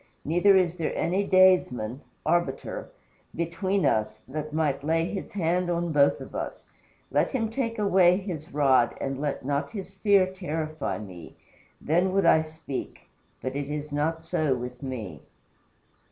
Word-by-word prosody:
Neither 175 +6 +4
is 180 -2 +1
there 165 - -2
any 190 +4 +1
daysman 160 - +3 0.2
[arbiter] 175 - -1 0.5
between 185 +4 0
us, 110 0 0
that 150 +3 -5
might 150 -3 0
lay 165 +2 +1
his 195 +2 -5
hand 180 -1 0
on 170 -1 -1
both 145 -2 +4
of - - -10
us. - - -5 0.5
Let - - +3
him 225 -5 -2
take 230 -2 -2
his 185 -4 +2
rod 140 -2 +3
away - - -16
and 135 0 -3
let 145 -3 -3
not 140 +1 -1
his 195 -3 -7
fear 200 -1 +4
terrify 160 -5 -3
me. 95 -6 -10 0.4
Then 175 +5 +1
would 195 -2 +2
I 160 - +6
speak; 155 -3 -7 0.3
but 130 +1 -3
it 140 0 -3
is 150 0 -4
not 160 +3 -1
so 155 -4 0
with 125 0 -7
me." 110 - -6
160 Hz, 155 wpm, -27 LUFS, 140-185 Hz, 0.5 s, I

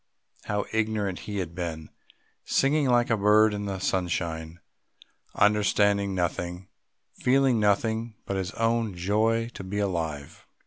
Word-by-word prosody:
How 105 -1 -1
ignorant 105 -4 -1
he 100 - -3
had 90 -4 -3
been, 85 -3 -5 0.5
singing 140 +1 +2
like 120 -1 +3
a 115 - +3
bird 105 +1 +4
in 105 0 -4
the 100 -1 -3
sunshine, 85 -3 -2 0.8
understanding 100 -1 +2
nothing, 90 +1 -3 0.5
feeling 130 -2 +3
nothing 110 +2 0
but 100 - -3
his 95 -2 -2
own 115 -3 0
joy 110 +6 +1
to 100 - -9
be 95 +2 -5
alive! 80 -8 -3
100 Hz, 130 wpm, -26 LUFS, 90-110 Hz, 0.8 s, bird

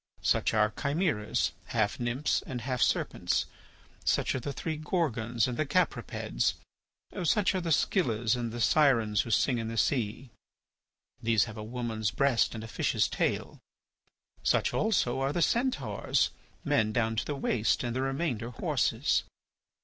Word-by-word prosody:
Such - - +2
are 105 0 +3
chimeras—half 130 - 0
nymphs 125 +4 0
and 125 -3 -4
half 125 +1 -2
serpents; - - +1 0.6
such - - +1
are - - -1
the 140 +3 -4
three 160 +3 -3
Gorgons 130 - 0
and 125 -2 -4
the 155 - +1
Capripeds; 145 - 0 0.7
such 200 +5 +2
are 185 - -1
the 170 - -3
Scyllas 120 - +2
and 120 -2 -3
the 120 - -6
Sirens 115 -5 +4
who - - -7
sing 120 +2 +2
in 115 - -3
the 115 0 -5
sea. 120 0 0 0.9
These 115 -2 +3
have 110 -3 -6
a 105 - -5
woman's 110 -2 -2
breast 125 +1 +2
and 110 - -6
a - - -7
fish's - - +1
tail. - - -2 0.8
Such - - +2
also 135 - +1
are 135 +1 0
the 170 +2 +1
Centaurs, 150 - +1 0.3
men 110 0 +2
down 115 0 0
to - - 0
the 145 - -3
waist 120 -5 +1
and 120 -1 -2
the 130 - 0
remainder 135 -4 -2
horses. 125 - +1
120 Hz, 150 wpm, -29 LUFS, 110-145 Hz, 0.9 s, Sirens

